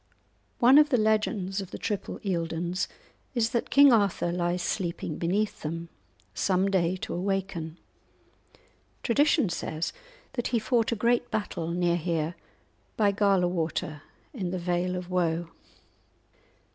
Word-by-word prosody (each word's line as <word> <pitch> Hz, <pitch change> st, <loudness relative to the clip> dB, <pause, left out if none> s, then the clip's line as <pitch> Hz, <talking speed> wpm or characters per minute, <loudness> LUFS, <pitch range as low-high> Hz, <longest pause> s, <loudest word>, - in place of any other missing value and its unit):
One 260 Hz, +4 st, +7 dB
of 300 Hz, 0 st, +5 dB
the 255 Hz, -, +3 dB
legends 215 Hz, -3 st, +1 dB
of 190 Hz, -, -8 dB
the -, -, -7 dB
triple 205 Hz, -3 st, -3 dB
Eildons 170 Hz, 0 st, -1 dB, 0.5 s
is 230 Hz, -2 st, +1 dB
that 235 Hz, -, -1 dB
King 280 Hz, -2 st, +7 dB
Arthur 200 Hz, -5 st, +2 dB
lies 175 Hz, 0 st, -1 dB
sleeping 175 Hz, -4 st, -3 dB
beneath 200 Hz, +5 st, 0 dB
them, 165 Hz, +2 st, -4 dB, 0.4 s
some 190 Hz, -, +1 dB
day 180 Hz, -2 st, +2 dB
to -, -, -4 dB
awaken. 180 Hz, -3 st, -2 dB, 1.3 s
Tradition 285 Hz, +1 st, +3 dB
says 160 Hz, -1 st, -3 dB, 0.4 s
that 240 Hz, -, -1 dB
he 235 Hz, -, +1 dB
fought 230 Hz, +1 st, +1 dB
a -, -, +1 dB
great 235 Hz, +3 st, +1 dB
battle 205 Hz, -6 st, -3 dB
near 175 Hz, 0 st, +1 dB
here, 165 Hz, -1 st, -1 dB, 0.6 s
by 205 Hz, -2 st, +4 dB
Gala 195 Hz, -3 st, +3 dB
Water, 160 Hz, -3 st, -2 dB, 0.3 s
in 195 Hz, -9 st, -3 dB
the 185 Hz, -, -2 dB
Vale 180 Hz, +1 st, -1 dB
of 180 Hz, 0 st, -6 dB
Woe. 170 Hz, -2 st, 0 dB
185 Hz, 135 wpm, -28 LUFS, 170-215 Hz, 1.3 s, One